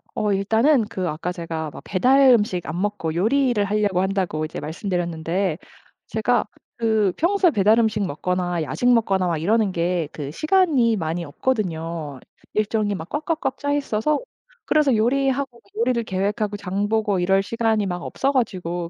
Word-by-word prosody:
어 215 Hz, -3 st, 0 dB
일단은 225 Hz, +6 st, +3 dB
그 190 Hz, -4 st, -4 dB
아까 160 Hz, +4 st, -3 dB
제가 165 Hz, -3 st, -4 dB
막 -, -, -10 dB
배달 260 Hz, +8 st, +4 dB
음식 205 Hz, -7 st, +2 dB
안 160 Hz, +3 st, -4 dB
먹고 205 Hz, -6 st, -2 dB
요리를 240 Hz, +3 st, +2 dB
하려고 205 Hz, -2 st, +1 dB
한다고 190 Hz, -5 st, -1 dB
이제 155 Hz, -, -6 dB
말씀드렸는데 170 Hz, +1 st, -2 dB, 0.5 s
제가 225 Hz, +3 st, +1 dB, 0.3 s
그 220 Hz, -4 st, +2 dB
평소에 360 Hz, +1 st, +3 dB
배달 215 Hz, 0 st, +4 dB
음식 220 Hz, -2 st, +1 dB
먹거나 180 Hz, +1 st, -2 dB
야식 245 Hz, +10 st, +1 dB
먹거나 195 Hz, -5 st, +2 dB
막 170 Hz, -2 st, 0 dB
이러는 205 Hz, +5 st, +1 dB
게 175 Hz, -2 st, -1 dB
그 145 Hz, -2 st, -6 dB
시간이 305 Hz, -, +2 dB
많이 170 Hz, -2 st, -3 dB
없거든요. 165 Hz, -, -3 dB, 0.3 s
일정이 215 Hz, -1 st, 0 dB
막 165 Hz, -2 st, -7 dB
꽉꽉꽉 300 Hz, -3 st, -2 dB
짜 285 Hz, 0 st, -1 dB
있어서 285 Hz, 0 st, 0 dB, 0.5 s
그래서 295 Hz, -5 st, +3 dB
요리하고 265 Hz, +2 st, 0 dB, 0.2 s
요리를 235 Hz, +1 st, +1 dB
계획하고 205 Hz, +1 st, -2 dB
장 200 Hz, +1 st, -2 dB
보고 215 Hz, -3 st, +1 dB
이럴 190 Hz, +2 st, +3 dB
시간이 220 Hz, 0 st, 0 dB
막 180 Hz, -2 st, -3 dB
없어 275 Hz, -, -1 dB
가지고 175 Hz, -9 st, -2 dB
205 Hz, 335 characters per minute, -22 LUFS, 175-235 Hz, 0.5 s, 배달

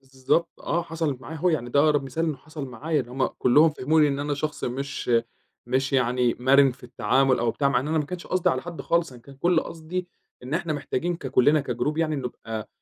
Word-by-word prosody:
بالضبط، 135 Hz, +5 st, -1 dB
آه 170 Hz, 0 st, -1 dB
حصَلت 160 Hz, -5 st, -3 dB
معايا 160 Hz, +3 st, -8 dB
أهو، 180 Hz, +4 st, +1 dB
يعني 120 Hz, -7 st, -1 dB
ده 140 Hz, -, +4 dB
أقرب 145 Hz, -2 st, +3 dB
مثال 135 Hz, +5 st, -2 dB
إنّه 155 Hz, -4 st, -1 dB
حصل 150 Hz, 0 st, -8 dB
معايا، 150 Hz, +5 st, -1 dB
إن 125 Hz, -, -7 dB
هُم 130 Hz, +1 st, 0 dB
كلُهم 150 Hz, +6 st, +4 dB
فهموني 150 Hz, +1 st, +2 dB
إن 140 Hz, -1 st, -1 dB
أنا 145 Hz, 0 st, -1 dB
شخص 150 Hz, +2 st, -3 dB
مش 135 Hz, +1 st, -4 dB, 0.6 s
مش 135 Hz, +3 st, 0 dB
يعني 125 Hz, -2 st, +2 dB
مرِن 135 Hz, +2 st, +5 dB
في 125 Hz, -, -16 dB
التعامل 125 Hz, +2 st, +2 dB
أو 120 Hz, 0 st, +1 dB
بتاع، 140 Hz, +4 st, +1 dB
مع 130 Hz, -3 st, +2 dB
إن 145 Hz, -, -4 dB
أنا 160 Hz, -, +1 dB
ما 150 Hz, -, 0 dB
كانش 180 Hz, +4 st, -7 dB
قصدي 185 Hz, -2 st, +2 dB
على 130 Hz, 0 st, -2 dB
حد 175 Hz, -1 st, -7 dB
خالص، 170 Hz, -4 st, 0 dB
أنا 125 Hz, -, -13 dB
كان 140 Hz, -, -14 dB
كل 170 Hz, +4 st, +2 dB
قصدي 170 Hz, +3 st, -5 dB, 0.3 s
إن 130 Hz, +4 st, -4 dB
إحنا 165 Hz, -1 st, -1 dB
محتاجين 155 Hz, +4 st, -2 dB
ككُلنا 140 Hz, +1 st, +3 dB
كجروب 140 Hz, +5 st, -2 dB
يعني 155 Hz, -2 st, +1 dB
نبقى 115 Hz, -4 st, -5 dB
140 Hz, 220 wpm, -25 LUFS, 130-160 Hz, 0.6 s, مرِن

